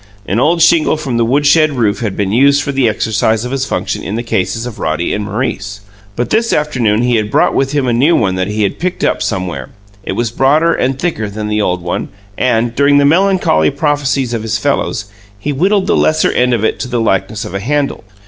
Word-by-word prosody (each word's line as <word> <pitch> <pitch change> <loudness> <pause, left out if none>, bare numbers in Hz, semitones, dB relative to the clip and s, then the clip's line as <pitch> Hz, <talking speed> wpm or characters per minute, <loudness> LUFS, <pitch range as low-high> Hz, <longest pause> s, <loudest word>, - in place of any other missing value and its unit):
An 105 - -1
old 165 +5 +3
shingle 165 -1 +3
from 135 -6 -3
the 120 - +2
woodshed 145 +5 +3
roof 110 -6 0
had 110 -5 -3
been 100 -2 -1
used 140 +5 +3
for 140 - -2
the 135 -4 +2
exercise 110 +1 0
of 125 - -5
his 135 -1 -1
function - - -3
in 100 - -4
the 120 - -3
cases 115 0 -2
of 115 -3 -8
Roddy 80 +2 -1
and 105 - -2
Maurice; 100 -2 -4 0.3
but 120 - -2
this 230 +1 +1
afternoon 120 -7 +1
he 120 -1 +2
had 105 -1 -1
brought - - +2
with 135 +1 0
him 145 -3 +1
a 120 - +1
new 145 +8 +3
one 95 -4 +1
that 95 0 -1
he 105 +1 -1
had 100 - -2
picked 180 +1 -3
up - - +1
somewhere. 90 - -3 0.3
It - - -4
was 120 -2 -2
broader 150 +7 +2
and 130 +1 -1
thicker 135 -10 -2
than 105 +1 -5
the 105 0 0
old 90 -3 -1
one 90 - -3 0.3
and, 120 -1 0
during 140 +2 +4
the 145 - +4
melancholy 165 - +3
prophecies 140 - -1
of 115 - -2
his 110 0 -2
fellows, 140 -6 -1 0.3
he 145 +8 -3
whittled 190 +7 +1
the - - +1
lesser 155 0 +2
end 125 0 +2
of 110 -1 -1
it - - -1
to - - -3
the 125 -1 -2
likeness 105 0 -1
of 105 - -8
a 95 - -2
handle. 140 +6 -2
120 Hz, 230 wpm, -14 LUFS, 105-145 Hz, 0.3 s, during